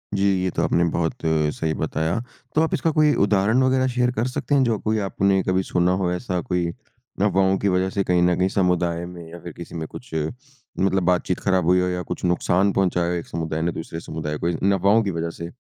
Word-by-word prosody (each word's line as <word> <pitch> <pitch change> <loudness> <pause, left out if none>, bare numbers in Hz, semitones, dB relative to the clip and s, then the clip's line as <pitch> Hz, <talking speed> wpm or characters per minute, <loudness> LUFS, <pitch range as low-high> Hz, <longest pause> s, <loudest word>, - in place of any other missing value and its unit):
जी 100 - +1 0.2
ये 95 - +1
तो - - -1
आपने 85 - +2
बहुत 80 -2 0
सही 80 0 0
बताया। 80 +6 -1 0.4
तो 155 - +4
आप 160 +3 0
इसका 165 0 +1
कोई 150 -1 +5
उदाहरण 105 +5 +2
वग़ैरह 130 0 +2
शेयर 125 0 +2
कर 120 +3 +1
सकते 140 +2 -1
हैं 135 - +4
जो 115 -4 +1
कोई 110 0 +2
आपने 95 0 +2
कभी 95 0 +1
सुना 90 0 +1
हो 90 -1 +1
ऐसा 90 -1 -2
कोई 90 -1 +1 0.5
अफ़वाहों 95 -1 +3
की 100 - 0
वजह 95 +1 0
से 100 - +2
कहीं 90 -1 +2
न 90 0 +3
कहीं 95 - +2
समुदाय 90 -2 +1
में 85 -1 -9
या 85 - -9
फ़िर 85 -2 -9
किसी 85 0 -9
में 80 -2 -4
कुछ 125 - -11
मतलब 95 - -3
बातचीत 90 0 0
ख़राब 95 -3 +1
हुई 90 +1 +4
हो 90 - 0
या 90 0 -2
कुछ - - -6
नुक़सान 90 +2 +2
पहुँचाया 90 -3 +1
हो - - 0
एक 85 - -5
समुदाय 80 -1 -3
ने 85 +1 0
दूसरे 80 0 -6
समुदाय 75 -2 -5
को 85 - -1
इन 95 +4 +1
अफ़वाहों 100 +4 +3
की 100 - -1
वजह 85 0 -2
से? 85 +1 -8
90 Hz, 230 wpm, -23 LUFS, 85-100 Hz, 0.5 s, कोई